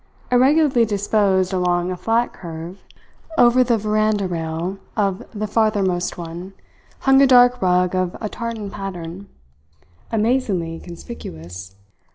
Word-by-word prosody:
Irregularly 265 0 +4
disposed 200 -3 +1
along 180 -1 +1
a - - -2
flat 225 +6 0
curve, 170 +2 -8 0.6
over 245 +1 +6
the 235 -2 +2
veranda 215 -1 +1
rail 170 +2 -3 0.2
of 195 -2 0
the 215 -1 -3
farthermost 200 -5 0
one 175 +3 -7 0.5
hung 270 0 +5
a 275 - +6
dark 245 -1 +5
rug 180 -1 +2
of 185 -1 -1
a 215 - -3
tartan 225 -2 -5
pattern, 190 -1 -7 0.8
amazingly 210 -8 0
conspicuous. 95 - -9
195 Hz, 120 wpm, -21 LUFS, 175-230 Hz, 0.8 s, over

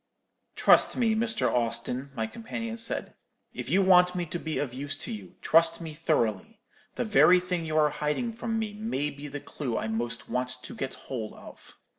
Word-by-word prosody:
"'Trust - - +5
me, 230 -3 +3
Mr. 220 -1 +1
Austin,' 125 +3 0
my 110 -2 -1
companion 230 - -5
said; 230 0 -3 0.4
'if - - -6
you 195 +1 +4
want 180 -1 +6
me 175 -1 -1
to 170 +1 -5
be 160 -1 -3
of 135 -4 -2
use 140 +2 -3
to - - -5
you, 215 - -8
trust 165 +1 +4
me 160 -2 -6
thoroughly. 150 - -1 0.4
The - - -1
very 185 -4 +6
thing 180 -2 -3
you 155 0 -1
are 150 -1 +4
hiding 150 +11 -1
from 225 0 -3
me 220 -2 -2
may 205 - -2
be 145 +1 -8
the 145 +1 -6
clue 130 -5 -4
I - - -2
most 115 +2 -2
want 125 0 -1
to - - -6
get 135 - -4
hold 115 -5 -6
of.' - - -14
165 Hz, 195 wpm, -28 LUFS, 135-215 Hz, 0.4 s, want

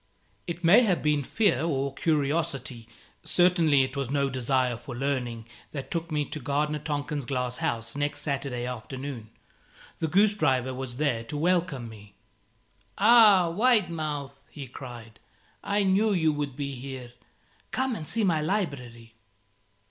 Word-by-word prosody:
It 170 0 -5
may 185 +9 +7
have 195 -8 +1
been 150 -1 +2
fear 160 - +1
or 140 -4 -1
curiosity, 140 -6 -1 0.4
certainly 170 -6 +4
it 130 +1 -4
was 140 -3 -2
no 140 -1 0
desire 130 -1 0
for 125 +2 -9
learning, 125 -4 -2 0.3
that 140 -3 -6
took 170 -1 -2
me 150 -1 0
to 155 - -7
Gardener 150 +3 -1
Tonken's 145 -1 -3
glass 125 -1 -2
house 115 0 -2
next 145 0 -2
Saturday 140 -4 -2
afternoon. 125 -1 -6 0.7
The 160 - 0
goose 200 +6 +4
driver 130 -9 +1
was 130 -1 -5
there 135 -6 0
to 145 +6 -5
welcome 165 -6 0
me. 105 -2 -13 0.8
"Ah, 210 -5 +7
wide 215 -1 +3
mouth," 145 -4 -4
he 140 -3 -8
cried; 120 -3 -10 0.4
"I 205 0 +1
knew 200 +3 +3
you 160 -4 +2
would 145 -3 -3
be 140 -1 -4
here. 130 -1 -8 0.6
Come 260 -2 -1
and 155 -7 -6
see 230 - 0
my 165 -6 +2
library." 125 - -3
145 Hz, 150 wpm, -27 LUFS, 125-170 Hz, 0.8 s, may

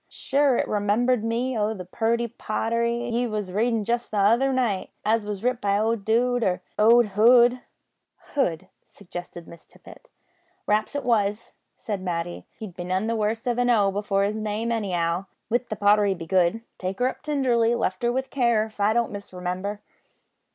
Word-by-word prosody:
Shure 275 -1 +1
it - - 0
remimbered 215 +3 +1
me 240 +3 -1
o' 215 0 0
the 180 -3 -8
purty 230 +5 0
pottery 235 +2 -2
ye 240 +1 0
was 210 -4 -4
readin' 225 +1 +1
just 240 +2 -1
the 215 - -3
other 230 +7 +3
night, 240 -7 0 0.2
as 215 0 +1
was 205 -1 -5
writ 250 -1 0
by 200 0 +1
O'Dood 230 +3 +1
or 180 -2 0 0.2
O'Hood 235 +2 +5 0.3
" - - -55 0.2
"Hood," 185 - 0 0.2
suggested 175 -3 -10
Miss 170 - -13
Tippet. - - -16 0.6
"P'r'aps 215 +6 +1
it 285 - -2
was," 215 -3 0 0.2
said 205 -4 -4
Matty; 175 -1 -4
"he'd 205 -6 -8
be 175 - -6
none 185 +3 -1
the 230 +1 -1
worse 220 +2 -1
of 245 -1 0
an 245 0 +2
O 205 -5 +3
before 200 0 0
his 205 +2 -1
name 215 +2 -2
anyhow. 180 -4 -1 0.2
But 240 +1 0
the 215 - -2
pottery 205 -1 +3
begood 175 +1 +1
with 225 - -10 0.2
`Take 185 +1 -3
her 250 - +2
up 260 - -5
tinderly, 250 -6 +1
lift 185 -5 -2
her 240 0 +1
with 265 +2 -3
care,' 235 -5 +2
if 215 -1 -15
I 205 +2 +3
don't 235 0 0
misremimber." 195 +1 -5
215 Hz, 180 wpm, -25 LUFS, 200-235 Hz, 0.6 s, O'Hood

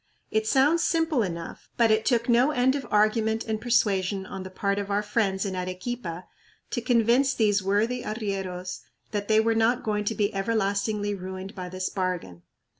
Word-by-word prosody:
It 220 0 0
sounds 295 +7 +3
simple 325 -7 +1
enough 170 -4 -5
but 230 -2 +4
it 220 0 +2
took 240 -3 +2
no 245 +3 +4
end 260 -3 +2
of 275 -3 -4
argument 220 +1 +2
and 220 -1 -2
persuasion 200 -5 +1
on 190 - -7
the 185 - -7
part 200 +1 -1
of 200 0 -4
our 205 +1 +1
friends 200 -3 0
in 190 -1 -3
Arequipa 185 0 -4 0.5
to 240 - -1
convince 245 +3 +3
these 210 -2 +2
worthy 210 +6 +1
arrieros 195 -5 -4 0.3
that 205 -1 -2
they 220 0 +4
were 225 +1 +2
not 230 +3 +2
going 210 -1 -1
to 225 - -1
be 205 0 0
everlastingly 205 0 0
ruined 190 0 -6
by 180 -1 -6
this 185 0 -3
bargain. 180 - -3
210 Hz, 180 wpm, -26 LUFS, 190-235 Hz, 0.5 s, but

